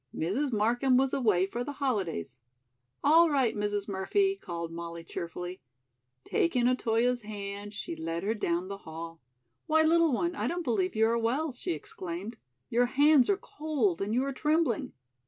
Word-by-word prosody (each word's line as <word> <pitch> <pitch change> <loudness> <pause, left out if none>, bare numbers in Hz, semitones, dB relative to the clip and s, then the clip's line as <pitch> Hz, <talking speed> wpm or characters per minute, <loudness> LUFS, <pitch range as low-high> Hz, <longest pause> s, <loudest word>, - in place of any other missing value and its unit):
Mrs. 245 - -1
Markham 245 +4 +2
was 265 0 +2
away 210 -8 +3
for 240 +5 -4
the 285 - -5
holidays. 195 - -2 0.6
"All 325 +3 +6
right, 265 -6 +2
Mrs. 205 -1 -1
Murphy," 390 - +1
called 170 - -6
Molly 170 0 -6
cheerfully. 175 +2 -6 0.6
Taking 250 -8 +1
Otoyo's 245 0 +1
hand, 205 -1 -6
she 170 - -5
led 165 +2 -4
her 210 +3 +1
down 175 -4 -1
the 200 0 -5
hall. 165 0 -8 0.5
"Why, 315 0 +4
little 330 0 +4
one, 340 +8 0
I - - -1
don't 350 +1 -2
believe 215 - 0
you 220 +1 +4
are 230 +1 +2
well," 270 +7 0
she 245 - -3
exclaimed. 180 +7 -6 0.3
"Your 245 +1 +2
hands 285 +1 +5
are 400 - +3
cold 285 - -1
and 200 +2 -1
you 250 +4 +2
are 275 - -2
trembling." 300 -4 0
225 Hz, 165 wpm, -29 LUFS, 185-275 Hz, 0.6 s, All